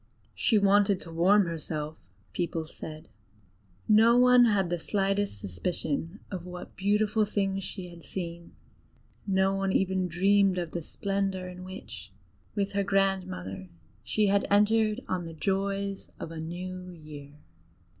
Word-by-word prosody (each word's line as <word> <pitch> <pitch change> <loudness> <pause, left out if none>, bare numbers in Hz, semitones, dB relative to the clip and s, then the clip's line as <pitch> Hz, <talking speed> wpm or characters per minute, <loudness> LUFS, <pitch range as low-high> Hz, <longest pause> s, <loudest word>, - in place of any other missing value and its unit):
"She 220 - +2
wanted 200 -1 +4
to 165 - -9
warm 190 +5 +4
herself," 155 -2 -4 0.4
people 170 -2 -2
said: 155 0 -9 0.8
no 225 +2 +6
one 250 0 +7
had 195 -6 +2
the 175 - 0
slightest 195 - 0
suspicion 160 - -3
of 185 -3 -4
what 180 0 -9
beautiful 210 +2 +2
things 195 -2 -1
she 180 -2 -6
had 170 -1 -12
seen; 170 -1 -6 0.7
no 190 0 +3
one 195 0 0
even 190 -1 +1
dreamed 195 +2 +3
of 170 -2 -3
the 170 - -3
splendor 195 +1 -2
in 180 0 -9
which, 110 - -9 0.4
with 200 -1 0
her 200 0 0
grandmother 185 - -1 0.3
she 165 - +1
had 200 0 +2
entered 215 +2 +3
on 180 -2 -2
the 165 - -7
joys 195 +2 -2
of 165 - -6
a 165 - -6
new 180 +3 -6
year. 150 -4 -11
190 Hz, 140 wpm, -28 LUFS, 170-200 Hz, 0.8 s, one